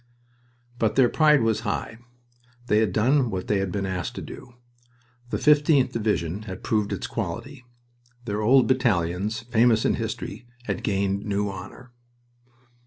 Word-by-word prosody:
But 110 Hz, -2 st, +1 dB
their 130 Hz, -3 st, +5 dB
pride 150 Hz, -4 st, +4 dB
was 115 Hz, -1 st, +1 dB
high. 115 Hz, -, -4 dB, 0.7 s
They 105 Hz, -2 st, +3 dB
had 110 Hz, -4 st, +1 dB
done 125 Hz, +6 st, +2 dB
what 95 Hz, -3 st, -4 dB
they 105 Hz, -, +1 dB
had 95 Hz, -1 st, -2 dB
been 100 Hz, 0 st, -2 dB
asked 90 Hz, -3 st, -4 dB
to -, -, -6 dB
do. 120 Hz, -1 st, -11 dB, 0.7 s
The -, -, -1 dB
15th 145 Hz, -2 st, +4 dB
Division 105 Hz, -5 st, -1 dB
had 95 Hz, -, -8 dB
proved 105 Hz, -2 st, 0 dB
its -, -, -3 dB
quality. 120 Hz, -, -5 dB, 0.6 s
Their 105 Hz, -1 st, -2 dB
old 130 Hz, +4 st, +5 dB
battalions, 105 Hz, -5 st, 0 dB
famous 115 Hz, -1 st, +2 dB
in -, -, +3 dB
history, 120 Hz, -, -5 dB, 0.2 s
had -, -, -3 dB
gained 100 Hz, 0 st, -1 dB
new 100 Hz, -1 st, -1 dB
honor. 95 Hz, +6 st, -10 dB
110 Hz, 150 wpm, -25 LUFS, 100-125 Hz, 0.7 s, their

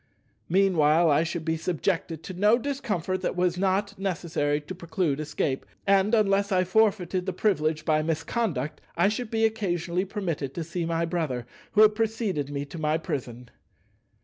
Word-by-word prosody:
Meanwhile 170 Hz, -4 st, +4 dB
I 145 Hz, +2 st, +4 dB
should 170 Hz, -1 st, -4 dB
be 160 Hz, 0 st, 0 dB
subjected 165 Hz, -1 st, -2 dB
to 185 Hz, -, -7 dB
no 210 Hz, +5 st, +4 dB
discomfort 210 Hz, -, -2 dB
that 185 Hz, -, -2 dB
was 180 Hz, -1 st, +1 dB
not 195 Hz, +2 st, 0 dB
necessary 165 Hz, -6 st, -1 dB
to 150 Hz, +5 st, -8 dB
preclude 170 Hz, -4 st, -1 dB
escape, 145 Hz, -3 st, -2 dB, 0.2 s
and, 200 Hz, +3 st, +4 dB
unless 200 Hz, -1 st, +2 dB
I 185 Hz, -1 st, +3 dB
forfeited 185 Hz, -2 st, +1 dB
the 190 Hz, -, -1 dB
privilege 155 Hz, -6 st, 0 dB
by 155 Hz, -2 st, +3 dB
misconduct, 160 Hz, -, -2 dB, 0.2 s
I 175 Hz, +4 st, +4 dB
should 220 Hz, +2 st, -3 dB
be 225 Hz, 0 st, +2 dB
occasionally 185 Hz, -4 st, -1 dB
permitted 170 Hz, -9 st, -3 dB
to 170 Hz, -, -2 dB
see 170 Hz, +1 st, -3 dB
my 165 Hz, 0 st, 0 dB
brother 155 Hz, -8 st, -2 dB, 0.3 s
who 210 Hz, -, +5 dB
had 215 Hz, 0 st, +7 dB
preceded 215 Hz, -, -1 dB
me 140 Hz, 0 st, -3 dB
to 145 Hz, +4 st, -9 dB
my 155 Hz, 0 st, +1 dB
prison. 125 Hz, -6 st, -5 dB
175 Hz, 165 wpm, -26 LUFS, 155-200 Hz, 0.3 s, had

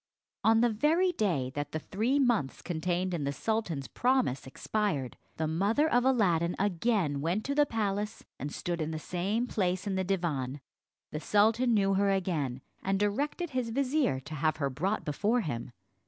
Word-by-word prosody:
On 225 Hz, +1 st, +5 dB
the 240 Hz, -, +4 dB
very 320 Hz, -, +3 dB
day 175 Hz, -, 0 dB
that 145 Hz, 0 st, -4 dB
the -, -, 0 dB
three 220 Hz, -, 0 dB
months 240 Hz, -, +1 dB
contained 180 Hz, +2 st, -1 dB
in 165 Hz, -4 st, -1 dB
the 140 Hz, -, 0 dB
sultan's 170 Hz, -5 st, -2 dB
promise 250 Hz, -, +1 dB
expired, 150 Hz, -, -2 dB, 0.2 s
the 160 Hz, -, 0 dB
mother 200 Hz, -, +2 dB
of 245 Hz, -5 st, +3 dB
Aladdin 180 Hz, -10 st, +2 dB
again 185 Hz, -6 st, +1 dB
went 175 Hz, +8 st, -1 dB
to 280 Hz, -, 0 dB
the 295 Hz, 0 st, +4 dB
palace, 210 Hz, -1 st, -2 dB
and 145 Hz, +2 st, -4 dB
stood 170 Hz, +1 st, -3 dB
in 155 Hz, -, -1 dB
the 160 Hz, -, -3 dB
same 190 Hz, +8 st, -1 dB
place 185 Hz, -6 st, -1 dB
in 200 Hz, -, -1 dB
the 190 Hz, 0 st, 0 dB
divan. 155 Hz, -8 st, -1 dB, 0.5 s
The 150 Hz, -, -3 dB
sultan 220 Hz, +7 st, +3 dB
knew 195 Hz, -1 st, +3 dB
her 200 Hz, +1 st, +3 dB
again, 160 Hz, -10 st, -1 dB, 0.2 s
and 195 Hz, 0 st, 0 dB
directed 285 Hz, -, -1 dB
his 255 Hz, -3 st, -1 dB
vizier 270 Hz, -, +1 dB
to 140 Hz, +4 st, -9 dB
have 155 Hz, +1 st, 0 dB
her 140 Hz, -3 st, -1 dB
brought 185 Hz, +11 st, -1 dB
before 210 Hz, +11 st, +1 dB
him. 120 Hz, -, -4 dB
195 Hz, 175 wpm, -30 LUFS, 155-225 Hz, 0.5 s, On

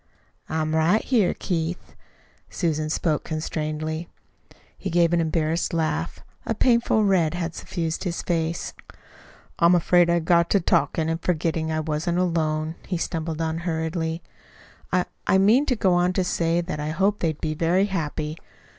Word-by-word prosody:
"I'm 155 Hz, 0 st, -1 dB
right 170 Hz, +7 st, +3 dB
here, 225 Hz, -8 st, +2 dB
Keith." 170 Hz, 0 st, -3 dB, 0.5 s
Susan 155 Hz, -3 st, -1 dB
spoke 155 Hz, -1 st, 0 dB
constrainedly. 155 Hz, +1 st, -3 dB, 0.7 s
He 195 Hz, -, -5 dB
gave 170 Hz, 0 st, +3 dB
an 170 Hz, -, +3 dB
embarrassed 165 Hz, +1 st, 0 dB
laugh. 155 Hz, -, -1 dB, 0.2 s
A 225 Hz, -, -2 dB
painful 235 Hz, -2 st, +3 dB
red 175 Hz, -5 st, +2 dB
had 170 Hz, -1 st, -3 dB
suffused 165 Hz, -3 st, -3 dB
his 175 Hz, -3 st, -3 dB
face. 165 Hz, -1 st, -1 dB, 0.9 s
"I'm 170 Hz, +1 st, +6 dB
afraid 175 Hz, 0 st, +4 dB
I 170 Hz, -, +3 dB
got 170 Hz, +1 st, +3 dB
to 200 Hz, -, +4 dB
talking 165 Hz, -2 st, +1 dB
and 165 Hz, +1 st, -2 dB
forgetting 165 Hz, -2 st, 0 dB
that 160 Hz, -, -1 dB
I -, -, 0 dB
wasn't 155 Hz, +3 st, -1 dB
alone," 160 Hz, -3 st, 0 dB
he 180 Hz, -, -1 dB
stumbled 165 Hz, -1 st, -3 dB
on 160 Hz, 0 st, -2 dB
hurriedly. 160 Hz, -1 st, -2 dB, 0.7 s
"I 180 Hz, 0 st, +2 dB, 0.2 s
I 190 Hz, -, +5 dB
meant 220 Hz, +9 st, +4 dB
to 255 Hz, -, +2 dB
go 190 Hz, -4 st, +2 dB
on 175 Hz, +1 st, +2 dB
to 185 Hz, -, +1 dB
say 170 Hz, -1 st, +1 dB
that 170 Hz, -3 st, -5 dB
I 150 Hz, +1 st, -2 dB
hoped 195 Hz, +6 st, +1 dB
they'd 160 Hz, -3 st, -1 dB
be 155 Hz, -1 st, -2 dB
very 170 Hz, +5 st, +2 dB
happy. 155 Hz, -5 st, -3 dB
165 Hz, 160 wpm, -24 LUFS, 160-180 Hz, 0.9 s, I'm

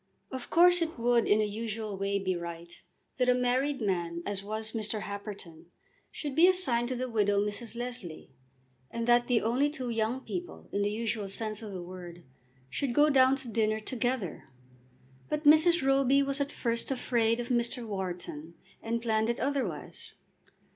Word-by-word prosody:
Of 260 Hz, -2 st, -6 dB
course 355 Hz, +1 st, +6 dB
it 330 Hz, -3 st, -2 dB
would 235 Hz, 0 st, +2 dB
in 210 Hz, +1 st, +4 dB
a -, -, +2 dB
usual 215 Hz, 0 st, -4 dB
way 195 Hz, +1 st, -1 dB
be 190 Hz, -2 st, -1 dB
right 170 Hz, 0 st, -7 dB, 0.5 s
that 250 Hz, 0 st, +3 dB
a 250 Hz, -, +5 dB
married 255 Hz, +2 st, +1 dB
man 170 Hz, -4 st, -1 dB
as 200 Hz, -1 st, -3 dB
was 220 Hz, +1 st, -4 dB
Mr. 215 Hz, -1 st, -2 dB
Happerton 200 Hz, -6 st, -8 dB, 0.4 s
should 290 Hz, -3 st, -5 dB
be 325 Hz, +5 st, +6 dB
assigned 265 Hz, -11 st, +2 dB
to 255 Hz, -, -2 dB
the 255 Hz, +1 st, -2 dB
widow 205 Hz, -4 st, +2 dB
Mrs. 210 Hz, +3 st, -2 dB
Leslie, 235 Hz, -, -6 dB, 0.6 s
and 230 Hz, 0 st, -3 dB
that 240 Hz, 0 st, +4 dB
the 245 Hz, -3 st, +3 dB
only 250 Hz, +6 st, +2 dB
two 260 Hz, -5 st, -4 dB
"young" 225 Hz, +3 st, -1 dB
people, 355 Hz, +5 st, -6 dB
in 200 Hz, -, 0 dB
the 205 Hz, -, +1 dB
usual 220 Hz, -1 st, -2 dB
sense 215 Hz, +1 st, -1 dB
of 215 Hz, -2 st, -7 dB
the 185 Hz, -2 st, -6 dB
word, 175 Hz, -1 st, -10 dB, 0.4 s
should 240 Hz, -, -2 dB
go 295 Hz, +1 st, +5 dB
down 260 Hz, -1 st, +5 dB
to 265 Hz, -2 st, -7 dB
dinner 220 Hz, -1 st, 0 dB
together. 240 Hz, -4 st, -2 dB, 0.9 s
But 300 Hz, 0 st, -2 dB
Mrs. 315 Hz, +1 st, +6 dB
Roby 270 Hz, 0 st, +4 dB
was 275 Hz, +1 st, -2 dB
at 280 Hz, -, -1 dB
first 235 Hz, -1 st, -2 dB
afraid 235 Hz, -3 st, +1 dB
of 240 Hz, -, -4 dB
Mr. 240 Hz, 0 st, 0 dB
Wharton, 175 Hz, -5 st, -5 dB, 0.3 s
and 230 Hz, +1 st, -2 dB
planned 220 Hz, -1 st, +1 dB
it 235 Hz, -, -1 dB
otherwise. 255 Hz, -, -3 dB
230 Hz, 175 wpm, -30 LUFS, 205-260 Hz, 0.9 s, course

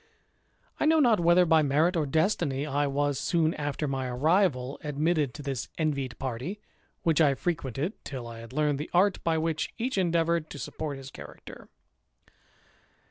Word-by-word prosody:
I -, -, +2 dB
know 320 Hz, 0 st, +5 dB
not 240 Hz, -8 st, +4 dB
whether 175 Hz, +1 st, +5 dB
by 160 Hz, -1 st, +5 dB
merit 155 Hz, +5 st, +2 dB
or 155 Hz, -3 st, 0 dB
destiny, 155 Hz, -3 st, +1 dB
I 145 Hz, 0 st, 0 dB
was, 140 Hz, 0 st, 0 dB
soon 165 Hz, 0 st, +1 dB
after 145 Hz, +1 st, -3 dB
iny 135 Hz, -2 st, -2 dB
arrival, 145 Hz, -1 st, +1 dB
admitted 150 Hz, -1 st, 0 dB
to 150 Hz, -, -8 dB
this 135 Hz, -3 st, -4 dB
envied 140 Hz, -5 st, -1 dB
party, 130 Hz, -, -4 dB, 0.4 s
which 165 Hz, -2 st, +3 dB
I 140 Hz, -3 st, +4 dB
frequented 160 Hz, -, -3 dB
till 130 Hz, -4 st, -6 dB
I 115 Hz, -1 st, -9 dB
had 115 Hz, +1 st, -10 dB
learned 150 Hz, 0 st, 0 dB
the 150 Hz, -, -5 dB
art 190 Hz, +2 st, +3 dB
by 165 Hz, -1 st, +1 dB
which 160 Hz, -1 st, -1 dB
each 240 Hz, -2 st, -1 dB
endeavoured 170 Hz, -2 st, +1 dB
to -, -, -8 dB
support 145 Hz, 0 st, -5 dB
his 135 Hz, 0 st, -10 dB
character. -, -, -12 dB
150 Hz, 165 wpm, -28 LUFS, 135-170 Hz, 0.4 s, know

